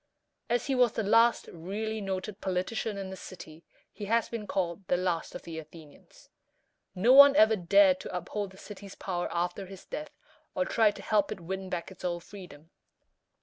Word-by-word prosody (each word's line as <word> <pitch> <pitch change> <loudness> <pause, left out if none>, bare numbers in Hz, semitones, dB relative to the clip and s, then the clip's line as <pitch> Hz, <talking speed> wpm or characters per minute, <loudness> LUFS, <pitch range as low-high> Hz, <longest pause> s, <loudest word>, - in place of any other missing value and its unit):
As 240 0 +1
he 275 - 0
was 250 -3 +3
the 225 - -1
last 230 +3 +4
really 210 +6 -4
noted 195 +1 -4
politician 195 +3 -2
in 195 -1 -5
the - - -6
city, 170 -3 -11 0.3
he 205 - -7
has 230 +3 +1
been 220 -3 -5
called 185 0 -2
the 180 - +2
"Last 175 -2 -2
of - - -7
the 165 -1 -6
Athenians." 155 -1 -15 0.7
No 225 +8 +4
one 280 +1 +9
ever 220 -3 +6
dared 190 0 +4
to - - -7
uphold 200 +3 -4
the 190 - -16
city's 200 -1 -10
power 175 -2 -3
after 175 +3 -2
his 195 0 -12
death, 305 +1 -7 0.4
or - - +1
tried 220 - +3
to - - -10
help 210 -2 +1
it - - -5
win 190 +2 -5
back 175 +1 -4
its 190 - -14
old 175 -1 -2
freedom. 175 -5 -12
190 Hz, 190 wpm, -29 LUFS, 180-215 Hz, 0.7 s, one